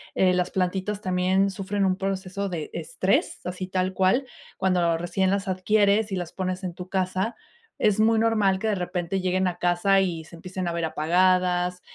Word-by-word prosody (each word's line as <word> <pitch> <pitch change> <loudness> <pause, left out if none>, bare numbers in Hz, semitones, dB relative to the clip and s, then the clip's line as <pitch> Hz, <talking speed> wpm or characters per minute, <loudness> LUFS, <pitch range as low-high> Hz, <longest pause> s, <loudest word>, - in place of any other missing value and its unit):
eh, 185 -1 +4
las 180 0 0
plantitas 190 +2 -1
también 185 +1 +2
sufren 195 +1 -2
un 185 -1 +2
proceso 195 0 -3
de 170 -5 -4
estrés 170 +4 -1
así 185 +1 -4
tal 185 0 -1
cual 190 +9 +2 0.3
cuando 180 -3 +1
recién 185 +3 0
las 195 0 -1
adquieres 205 +2 +2
y - - +1
las 175 -2 -4
pones 185 0 -3
en 180 -2 -3
tu 180 +1 -8
casa, 190 +3 -1 0.4
es 210 0 +2
muy 225 +1 +4
normal 215 -4 +2
que 220 - -2
de 210 - +1
repente 180 0 -2
lleguen 185 0 +1
a 180 -1 -3
casa 175 +3 +3
y 170 -4 -1
se 170 - -13
empiecen 185 +1 -5
a 170 - -3
ver 170 -1 -1
apagadas, 180 +2 +2
185 Hz, 185 wpm, -25 LUFS, 180-195 Hz, 0.4 s, eh